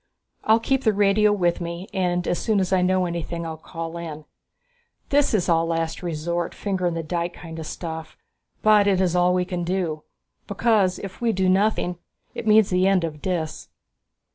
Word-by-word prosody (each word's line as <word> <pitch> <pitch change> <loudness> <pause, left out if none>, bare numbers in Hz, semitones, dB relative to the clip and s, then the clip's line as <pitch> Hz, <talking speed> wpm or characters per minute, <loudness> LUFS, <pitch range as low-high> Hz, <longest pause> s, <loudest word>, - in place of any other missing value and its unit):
I'll 220 +1 +5
keep 270 +3 0
the 220 - +3
radio 205 +1 +3
with 175 -4 +1
me 170 +2 -5
and 180 -2 0
as 175 - 0
soon 215 -3 +1
as 190 0 0
I 185 - +3
know 185 0 +2
anything 170 -1 -4
I'll 160 -1 -4
call 165 +1 -7
in. 155 -3 -7 0.8
This 290 -1 +3
is 185 - 0
all 165 -1 +2
last 165 -1 -2
resort, 170 0 -3
finger 190 -3 -1
in 170 - -1
the 165 - -3
dike 170 +2 -3
kind 165 -1 -9
of 160 - -6
stuff, 160 -1 -6 0.5
but 210 -1 +5
it 195 -2 +3
is 180 -2 +1
all 180 0 +3
we 180 0 +1
can 180 -1 -3
do. 170 -3 -2 0.5
Because 200 -3 +2
if 195 +2 -8
we 235 -1 +2
do 190 -2 0
nothing, 185 -2 +1 0.3
it - - -6
means 215 -2 +5
the 185 +1 +3
end 195 -3 +3
of 155 -3 -5
Dis." 170 -4 -3
180 Hz, 190 wpm, -23 LUFS, 170-195 Hz, 0.8 s, I'll